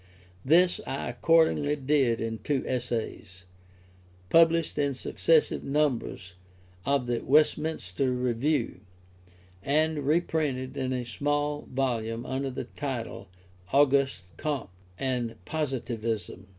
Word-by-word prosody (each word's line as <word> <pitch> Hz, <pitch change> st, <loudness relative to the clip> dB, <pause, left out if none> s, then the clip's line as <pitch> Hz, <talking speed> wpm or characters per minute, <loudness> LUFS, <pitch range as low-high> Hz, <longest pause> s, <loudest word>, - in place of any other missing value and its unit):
This 175 Hz, +5 st, +4 dB
I 135 Hz, -, -3 dB
accordingly 160 Hz, -3 st, +3 dB
did 135 Hz, -5 st, +2 dB
in 115 Hz, 0 st, -3 dB
two 135 Hz, +5 st, -1 dB
essays, 110 Hz, -6 st, -4 dB, 0.9 s
published 165 Hz, -2 st, +4 dB
in 140 Hz, -2 st, +1 dB
successive 160 Hz, +4 st, +2 dB
numbers 135 Hz, -10 st, -1 dB, 0.5 s
of 140 Hz, -2 st, +2 dB
the 120 Hz, -1 st, -1 dB
Westminster 145 Hz, -, +1 dB
Review, 125 Hz, -, 0 dB, 0.8 s
and 155 Hz, +5 st, +1 dB
reprinted 145 Hz, -3 st, 0 dB
in 130 Hz, -1 st, -2 dB
a 125 Hz, -1 st, -2 dB
small 145 Hz, +3 st, -1 dB
volume 120 Hz, -3 st, -1 dB
under 135 Hz, +1 st, -2 dB
the 130 Hz, -, -4 dB
title 125 Hz, -8 st, -5 dB, 0.4 s
Auguste 135 Hz, -6 st, +3 dB
Comte 145 Hz, -9 st, -3 dB, 0.3 s
and 125 Hz, -3 st, -2 dB
Positivism. 115 Hz, -9 st, -3 dB
135 Hz, 100 wpm, -28 LUFS, 120-150 Hz, 0.9 s, This